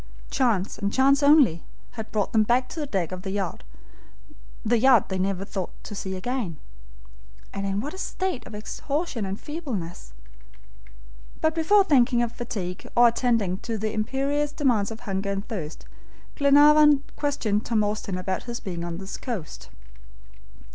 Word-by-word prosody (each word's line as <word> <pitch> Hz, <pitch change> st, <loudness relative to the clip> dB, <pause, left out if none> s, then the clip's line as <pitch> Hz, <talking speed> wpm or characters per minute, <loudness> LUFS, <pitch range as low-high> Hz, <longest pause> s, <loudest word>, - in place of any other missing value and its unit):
Chance, 220 Hz, -7 st, +1 dB
and 200 Hz, 0 st, -1 dB
chance 275 Hz, +3 st, +4 dB
only, 285 Hz, -, +5 dB, 0.3 s
had 220 Hz, -2 st, -7 dB
brought 210 Hz, -2 st, 0 dB
them 220 Hz, -, +5 dB
back 245 Hz, +4 st, +2 dB
to 330 Hz, -, -6 dB
the 295 Hz, -, -3 dB
deck 185 Hz, -, -1 dB
of 185 Hz, 0 st, -5 dB
the 190 Hz, -, -5 dB
yacht 195 Hz, 0 st, -3 dB, 1.0 s
they 230 Hz, -4 st, +4 dB
never 195 Hz, 0 st, -1 dB
thought 190 Hz, -2 st, -4 dB
to -, -, -8 dB
see 190 Hz, -1 st, -4 dB
again. 195 Hz, -, -3 dB, 1.0 s
And 195 Hz, 0 st, -3 dB
in 195 Hz, +1 st, -1 dB
what 295 Hz, +6 st, -5 dB
a 375 Hz, -, -8 dB
state 370 Hz, -14 st, -3 dB
of 220 Hz, -, -9 dB
exhaustion 265 Hz, -, -3 dB
and 195 Hz, +2 st, -4 dB
feebleness. 210 Hz, -, -6 dB, 1.3 s
But 315 Hz, 0 st, +2 dB
before 365 Hz, +6 st, +4 dB
thinking 250 Hz, -7 st, +3 dB
of 235 Hz, -, -2 dB
fatigue, 195 Hz, -8 st, -5 dB
or 240 Hz, 0 st, +7 dB
attending 230 Hz, -6 st, 0 dB
to 230 Hz, -2 st, -4 dB
the 215 Hz, +1 st, -2 dB
imperious 275 Hz, +6 st, -1 dB
demands 245 Hz, -9 st, +1 dB
of 225 Hz, 0 st, -8 dB
hunger 195 Hz, 0 st, -3 dB
and 200 Hz, +1 st, -3 dB
thirst, 165 Hz, -9 st, -6 dB, 0.5 s
Glenarvan 290 Hz, 0 st, +6 dB
questioned 220 Hz, -8 st, -1 dB
Tom 220 Hz, -2 st, +2 dB
Austin 205 Hz, -2 st, -2 dB
about 185 Hz, 0 st, -3 dB
his 240 Hz, -1 st, -5 dB
being 175 Hz, -3 st, -5 dB
on 170 Hz, -1 st, -4 dB
this 190 Hz, +1 st, -6 dB
coast. 220 Hz, -, -6 dB
225 Hz, 155 wpm, -25 LUFS, 195-275 Hz, 1.3 s, or